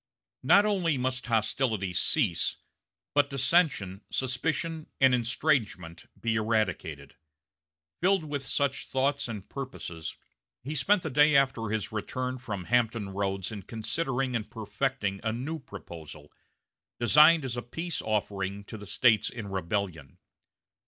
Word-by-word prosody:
Not 200 +1 +6
only 180 -8 +1
must 130 0 -2
hostilities 110 -4 0
cease, 110 - +1 0.6
but 145 -1 +4
dissension, 135 - +2
suspicion, 155 +5 -1
and 130 -1 +6
estrangement 115 - 0
be 115 -1 0
eradicated. 90 -10 -1 0.8
Filled 190 0 +3
with 145 -2 -3
such 140 0 -1
thoughts 135 +1 0
and 105 -5 -6
purposes, 110 - -6 0.5
he 145 +5 -4
spent 175 +7 +3
the 160 - -3
day 150 +3 +5
after 130 -5 +3
his 110 -2 -2
return 125 +4 -3
from 100 -6 -5
Hampton 115 -1 +1
Roads 95 0 -2
in 105 -2 -6
considering 125 - -2
and 110 -2 -2
perfecting 105 -1 -2
a 110 - 0
new 140 +8 -4
proposal, 80 - -10 0.7
designed 150 +6 +6
as 125 -2 -3
a 120 - -2
peace 165 +8 -4
offering 100 -2 -2
to 110 +2 -9
the 105 - -9
States 110 -1 +4
in 110 -5 -7
rebellion. 90 -5 -3
120 Hz, 130 wpm, -29 LUFS, 100-140 Hz, 0.8 s, Not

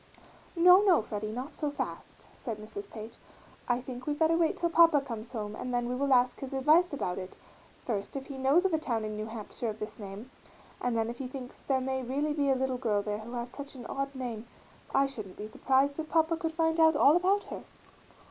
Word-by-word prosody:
"No, 360 +3 +8
no, 370 - +4
Freddie, 215 0 -4
not 255 +6 -5
so 295 - -2
fast," 285 - -6
said 230 -5 -5
Mrs. 215 -1 -8
Page. 220 +1 -9 0.5
"I 245 0 +2
think 255 +1 -8
we 295 - 0
better 320 +2 +3
wait 330 -1 +2
till 340 -1 0
papa 330 -3 +6
comes 235 -4 -7
home 215 -3 -4
and 250 - -5
then 240 -1 0
we 245 - -2
will 275 +2 0
ask 250 -1 +4
his 270 0 -6
advice 310 +7 +4
about 190 -11 -2
it: 185 0 -8 0.5
first, 205 -2 -3
if 270 -1 -4
he 275 -2 -7
knows 280 +8 +4
of 380 - +2
a 315 - +3
town 230 -7 -2
in 215 0 -4
New 215 +1 -4
Hampshire 225 +1 -5
of 215 - -5
this 215 - -6
name, 205 +5 -8 0.5
and 245 -2 0
then 225 0 +1
if 235 +1 -6
he 265 - -3
thinks 255 -1 -8
there 265 -2 0
may 265 0 -1
really 280 +4 -1
be 285 -2 +1
a 270 - +4
little 260 -1 -1
girl 210 -5 +1
there 210 0 -2
who 230 +3 -9
has 240 0 -4
such 285 0 -8
an 245 -2 -9
odd 275 0 -3
name 240 -3 -5 0.4
I 275 - +4
shouldn't 215 -9 -7
be 210 - -5
surprised 270 +6 +1
if 315 0 -4
Papa 325 0 +3
could 325 0 -3
find 325 -1 +1
out 320 -1 +6
all 290 +1 +6
about 380 +3 +3
her." - - -7
260 Hz, 235 wpm, -30 LUFS, 225-295 Hz, 0.5 s, No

